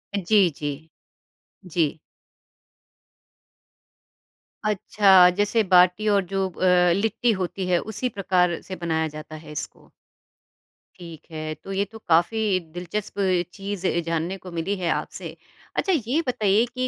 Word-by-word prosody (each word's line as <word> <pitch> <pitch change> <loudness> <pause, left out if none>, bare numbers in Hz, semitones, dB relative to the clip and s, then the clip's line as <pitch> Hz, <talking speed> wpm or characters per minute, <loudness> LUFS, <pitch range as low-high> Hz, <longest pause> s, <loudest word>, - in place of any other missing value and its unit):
जी, 195 -1 +3
जी। 145 +2 -5 0.8
जी। 160 -2 0 2.7
अच्छा 195 -3 +5
जैसे 205 +2 +2
बाटी 185 +2 +4
और 200 -2 +3
जो 195 +1 -1
अ, 180 0 +3
लिट्टी 225 +3 +1
होती 185 +1 -3
है 175 -1 +3
उसी 220 +4 -3
प्रकार 180 -4 +1
से 185 - -7
बनाया 160 -2 -1
जाता 155 +1 -9
है 155 -1 -11
इसको। 150 - -8 1.1
ठीक 165 -3 -10
है। 155 0 -4
तो 195 - -8
ये 200 +1 0
तो 225 - -10
काफ़ी 175 +7 +3 0.4
दिलचस्प 190 +3 -5 0.3
चीज़ 195 -1 -4
अ, 170 - +1
जानने 170 +4 -2
को 180 - -7
मिली 195 +5 -1
है 170 - +1
आपसे। - - -7 0.4
अच्छा 385 - +1
ये 300 +7 +1
बताइए 215 -2 +2
कि 255 0 0
185 Hz, 130 wpm, -24 LUFS, 170-205 Hz, 2.7 s, अच्छा